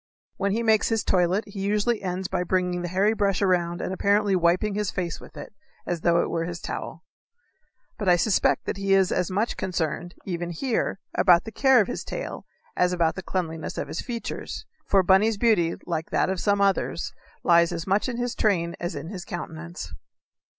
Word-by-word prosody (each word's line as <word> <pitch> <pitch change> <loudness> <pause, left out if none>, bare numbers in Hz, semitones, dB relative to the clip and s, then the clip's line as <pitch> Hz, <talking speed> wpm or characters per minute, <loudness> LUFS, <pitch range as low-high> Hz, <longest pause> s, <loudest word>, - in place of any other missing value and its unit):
When 200 0 0
he 230 +2 0
makes 220 -2 +3
his 225 -2 +1
toilet 185 +3 +2
he 200 -1 -9
usually 210 +3 +1
ends 185 -1 -3
by 180 - -1
bringing 180 0 0
the 175 - -3
hairy 195 +5 +2
brush 200 -3 +1
around 175 -3 +1
and 185 - -3
apparently 200 +1 +2
wiping 180 +4 +2
his 210 -1 -1
face 175 -4 -3
with - - -14
it, - - -9 0.3
as 175 -2 -2
though 170 0 +3
it - - -3
were 165 -1 -1
his 175 0 -5
towel. - - -6 1.0
But 205 -4 +1
I 175 - +7
suspect 190 +4 +2
that - - -3
he 195 0 +2
is 190 -1 +3
as 180 - 0
much 205 +5 -1
concerned, 175 0 -2
even 175 -2 -3
here, 220 +6 -1 0.2
about 175 -2 +5
the 225 - -8
care 265 +1 +5
of 205 - -1
his - - -4
tail - - -6 0.3
as 180 0 +2
about 170 -2 +2
the 190 - -6
cleanliness 165 -4 -3
of - - -3
his - - -3
features, 235 -3 -5 0.2
for 195 -1 +4
Bunny's 200 +4 +4
beauty, 200 -8 +3
like 165 -2 -3
that - - +1
of 190 - -2
some 205 +1 +2
others, 195 -1 0 0.3
lies 170 -1 +5
as 170 -1 -4
much 200 +6 +1
in 240 - -4
his 245 0 -1
train 170 -5 +1
as 175 - -3
in 165 - -6
his 185 -3 -6
countenance. 170 0 -7
185 Hz, 200 wpm, -25 LUFS, 175-205 Hz, 1.0 s, I